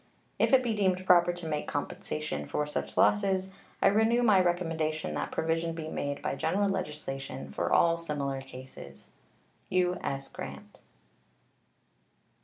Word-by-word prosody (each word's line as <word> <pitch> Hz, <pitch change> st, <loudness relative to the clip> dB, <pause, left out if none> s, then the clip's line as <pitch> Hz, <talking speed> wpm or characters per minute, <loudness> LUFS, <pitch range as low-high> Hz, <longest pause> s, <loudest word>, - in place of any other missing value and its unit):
If -, -, +3 dB
it 265 Hz, -1 st, +6 dB
be 235 Hz, -2 st, 0 dB
deemed 185 Hz, -3 st, +1 dB
proper 175 Hz, -1 st, +6 dB
to 175 Hz, -1 st, -7 dB
make 150 Hz, -1 st, -2 dB
compensation 75 Hz, 0 st, -3 dB
for 150 Hz, -, -1 dB
such 150 Hz, -, -4 dB
losses, 190 Hz, -2 st, +3 dB, 0.3 s
I -, -, +7 dB
renew 220 Hz, +4 st, +3 dB
my 205 Hz, -5 st, +6 dB
recommendation 165 Hz, -3 st, -1 dB
that -, -, -2 dB
provision 165 Hz, +1 st, 0 dB
be 160 Hz, -1 st, -5 dB
made 145 Hz, -2 st, -3 dB
by -, -, -1 dB
general 195 Hz, +8 st, +1 dB
legislation 150 Hz, -7 st, -4 dB
for -, -, -2 dB
all 170 Hz, 0 st, +4 dB
similar 140 Hz, -4 st, -3 dB
cases. 130 Hz, -, -11 dB, 0.6 s
U.S. 180 Hz, -7 st, 0 dB
GRANT. -, -, -9 dB
165 Hz, 135 wpm, -30 LUFS, 145-185 Hz, 0.6 s, I